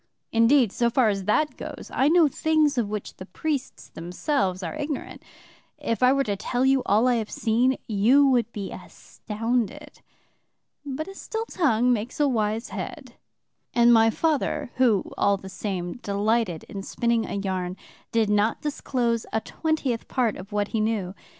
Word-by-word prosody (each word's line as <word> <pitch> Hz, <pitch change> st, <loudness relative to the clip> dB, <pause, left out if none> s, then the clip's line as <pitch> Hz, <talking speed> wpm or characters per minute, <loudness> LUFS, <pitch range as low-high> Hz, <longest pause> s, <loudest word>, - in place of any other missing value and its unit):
Indeed, 230 Hz, 0 st, +4 dB
so 235 Hz, +2 st, +1 dB
far 240 Hz, -1 st, +3 dB
as 195 Hz, -2 st, -2 dB
that 300 Hz, +9 st, +1 dB
goes, -, -, -8 dB
I 275 Hz, -, +3 dB
know 335 Hz, -1 st, +5 dB
things 305 Hz, 0 st, +2 dB
of 235 Hz, -5 st, 0 dB
which 210 Hz, -1 st, -5 dB
the 185 Hz, -, -8 dB
priests 290 Hz, 0 st, -4 dB
themselves 185 Hz, -, -2 dB
are -, -, -4 dB
ignorant. 295 Hz, -2 st, -5 dB, 0.6 s
If 230 Hz, -3 st, -2 dB
I 250 Hz, 0 st, +6 dB
were 275 Hz, 0 st, +2 dB
to 205 Hz, -5 st, -2 dB
tell 245 Hz, +6 st, -1 dB
you 270 Hz, 0 st, +4 dB
all 215 Hz, +5 st, +4 dB
I 245 Hz, -1 st, +3 dB
have 220 Hz, -2 st, -3 dB
seen, 245 Hz, +4 st, +1 dB
you 235 Hz, +7 st, +4 dB
would 240 Hz, -4 st, +2 dB
be 200 Hz, -4 st, -5 dB
astounded. 240 Hz, +6 st, -4 dB, 0.8 s
But 290 Hz, +3 st, -5 dB
a 390 Hz, -, -8 dB
still 445 Hz, +3 st, -4 dB
tongue 250 Hz, -, +2 dB
makes 230 Hz, +4 st, -4 dB
a 295 Hz, -, +4 dB
wise 220 Hz, -2 st, -1 dB
head, -, -, -7 dB, 0.6 s
and 240 Hz, 0 st, +6 dB
my 225 Hz, 0 st, +6 dB
father, 295 Hz, -2 st, -1 dB
who, 235 Hz, -7 st, +3 dB, 0.2 s
all 200 Hz, 0 st, +3 dB
the 190 Hz, 0 st, -10 dB
same, 185 Hz, -2 st, -4 dB
delighted 205 Hz, -4 st, 0 dB
in 200 Hz, -, -7 dB
spinning 235 Hz, +3 st, 0 dB
a -, -, -4 dB
yarn, 185 Hz, -2 st, -3 dB, 0.3 s
did 225 Hz, -2 st, +2 dB
not 210 Hz, +2 st, +2 dB
disclose 245 Hz, -5 st, -1 dB
a 220 Hz, -, +1 dB
twentieth 280 Hz, -3 st, -2 dB
part 240 Hz, -5 st, 0 dB
of 195 Hz, +3 st, -10 dB
what 205 Hz, 0 st, -1 dB
he 225 Hz, -, -1 dB
knew. 210 Hz, -4 st, -1 dB
230 Hz, 170 wpm, -25 LUFS, 205-270 Hz, 0.8 s, I